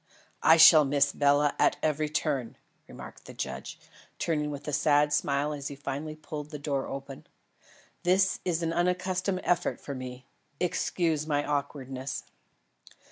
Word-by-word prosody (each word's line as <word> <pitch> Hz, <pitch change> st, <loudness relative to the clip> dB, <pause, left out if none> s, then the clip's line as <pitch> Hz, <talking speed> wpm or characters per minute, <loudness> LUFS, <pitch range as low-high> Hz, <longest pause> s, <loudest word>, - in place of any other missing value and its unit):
"I 160 Hz, -, +6 dB
shall 160 Hz, -1 st, +9 dB
miss 140 Hz, 0 st, +2 dB
Bela 145 Hz, 0 st, +3 dB
at -, -, +3 dB
every 155 Hz, 0 st, 0 dB
turn," 140 Hz, -6 st, -2 dB, 0.3 s
remarked -, -, -11 dB
the -, -, -11 dB
judge, 65 Hz, 0 st, -5 dB, 0.4 s
turning 150 Hz, -3 st, -1 dB
with 145 Hz, 0 st, -7 dB
a 150 Hz, -, -3 dB
sad 145 Hz, +1 st, +3 dB
smile 145 Hz, +1 st, 0 dB
as 140 Hz, -1 st, -5 dB
he 140 Hz, -, -6 dB
finally 145 Hz, +2 st, -5 dB
pulled 150 Hz, -1 st, -7 dB
the 150 Hz, -, -6 dB
door 140 Hz, -2 st, -2 dB
open. 135 Hz, 0 st, -8 dB, 0.7 s
"This 190 Hz, +2 st, +2 dB
is 170 Hz, -2 st, -1 dB
an 165 Hz, 0 st, -1 dB
unaccustomed 180 Hz, +2 st, 0 dB
effort 175 Hz, 0 st, 0 dB
for 140 Hz, -, -7 dB
me. 130 Hz, -1 st, -8 dB, 0.3 s
Excuse 165 Hz, -3 st, 0 dB
my 145 Hz, -1 st, 0 dB
awkwardness." 140 Hz, -2 st, -4 dB
150 Hz, 145 wpm, -28 LUFS, 140-160 Hz, 0.7 s, shall